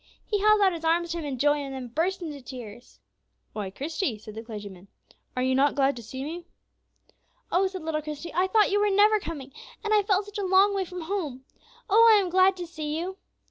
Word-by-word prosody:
He 415 - 0
held 425 +1 +4
out 380 -2 +4
his 330 -1 -6
arms 335 +1 +1
to 340 - -2
him 315 - -5
in 275 -3 -4
joy, 290 +3 +3
and 275 -2 -5
then 255 -2 -6
burst 345 +8 -1
into 295 -4 -6
tears. 245 -2 -10 0.5
"Why, 205 -3 -4
Christie," 280 - -3
said 215 0 -11
the 220 - -6
clergyman, 205 -5 -9 0.5
"are 255 - +1
you 260 0 +2
not 275 +2 +3
glad 275 0 +2
to 240 - -8
see 260 +4 -7
me?" 340 +4 -6 1.0
"Oh," 380 +2 +3
said 375 -3 -7
little 315 -1 -2
Christie, 305 +2 -7
"I 365 +3 +2
thought 420 +1 +3
you 410 - +3
were 415 0 +3
never 420 +2 +5
coming, 290 -6 -7 0.3
and 430 -1 0
I 420 - +5
felt 400 0 +1
such 415 0 -7
a - - -1
long 380 +2 +4
way 390 -1 -1
from 360 0 -7
home! 320 -8 -4 0.4
Oh, 455 +2 +6
I 425 - +7
am 380 -3 -1
so - - -10
glad 375 +1 +4
to 355 - -5
see 310 -2 -4
you." 370 +3 -4
330 Hz, 235 wpm, -26 LUFS, 270-385 Hz, 1.0 s, I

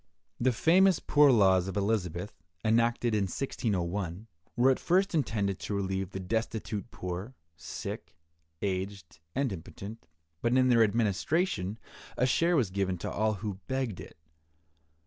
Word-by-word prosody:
The 130 +2 +3
famous 180 - +4
poor 145 -1 +5
laws 95 -5 +4
of 95 - -4
Elizabeth, 100 -2 -1 0.3
enacted 115 +1 +2
in 105 -2 +2
1601, 95 -4 -2 0.3
were 125 +3 +5
at 130 - 0
first 190 +3 +2
intended 100 - 0
to 105 - -3
relieve 95 -1 -2
the 95 - -6
destitute 110 0 -3
poor, 90 +8 -6 0.2
sick, 80 - -7 0.5
aged, 95 -3 -3 0.2
and 135 -5 0
impotent, 100 +5 -9 0.3
but 120 +2 +2
in 130 0 +4
their 120 -2 +5
administration 110 - 0 0.4
a 125 - +3
share 170 +7 +3
was 120 - +2
given 95 -1 -1
to - - -4
all 110 +1 +1
who 100 -3 -3
begged 130 -7 -2
it. - - -11
105 Hz, 140 wpm, -30 LUFS, 95-125 Hz, 0.5 s, poor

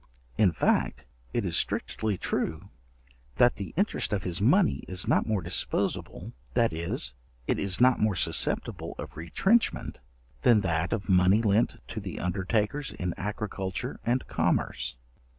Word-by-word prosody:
In 100 -5 +4
fact, 80 - 0 0.3
it - - -1
is - - -1
strictly 110 -3 0
true, 80 -2 -2 0.7
that 120 0 +4
the 100 - -6
interest 200 +4 0
of 100 -2 -1
his 90 0 -1
money 170 - +3
is 90 -1 -3
not - - +2
more 105 -5 0
disposable, 90 +3 -2 0.2
that 115 -5 +3
is, 85 -5 -1 0.3
it - - 0
is 100 -2 +1
not 125 0 +5
more 105 -2 +2
susceptible - - 0
of - - -8
retrenchment, 190 - +1 0.4
than 115 -4 +5
that 85 -3 0
of 110 -4 -2
money 95 +3 +4
lent 105 +2 +2
to 110 - -4
the 100 -3 -6
undertakers 105 +9 -1
in 90 -2 -3
agriculture 105 +3 -4
and 125 +2 0
commerce. - - -1
100 Hz, 145 wpm, -28 LUFS, 90-115 Hz, 0.7 s, not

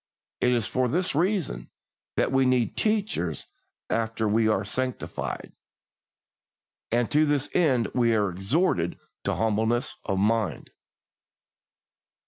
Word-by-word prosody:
It 125 - +3
is 120 -3 +1
for 130 +2 0
this 180 +9 +1
reason 180 +2 0 0.5
that - - +1
we 135 0 +4
need 125 -2 +2
teachers 215 - 0 0.4
after 110 -1 -1
we 110 +1 +3
are 105 -2 +1
sanctified, 125 +4 -4 1.4
and 120 0 +1
to 150 +1 +4
this 145 -1 0
end 130 - +3
we 120 -2 +3
are 105 -3 +1
exhorted 95 - 0 0.3
to - - +1
humbleness 110 +4 0
of 95 - -1
mind. 110 +1 0
120 Hz, 115 wpm, -26 LUFS, 110-140 Hz, 1.4 s, we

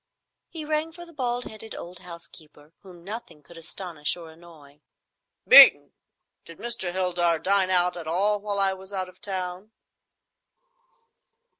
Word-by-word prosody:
He 320 -3 -8
rang 310 +1 -2
for 345 +1 -12
the 335 - -17
bald 245 -3 -3
headed 220 0 -10
old 175 +1 -10
housekeeper, 160 -3 -14
whom 180 -3 -15
nothing 190 -7 -9
could 170 - -17
astonish 165 -1 -5
or 165 -2 -12
annoy. 160 -3 -18 0.7
"Beeton, - - +9 0.5
did 165 - -13
Mr. 225 -6 -1
Heldar 175 -2 0
dine 190 +3 +1
out 180 -1 +2
at 170 -2 -8
all 200 +5 0
while 200 -1 -3
I 195 -1 +2
was 190 +1 -12
out 185 -2 -4
of 185 - -21
town?" 190 +2 -5
185 Hz, 145 wpm, -24 LUFS, 170-205 Hz, 0.7 s, Beeton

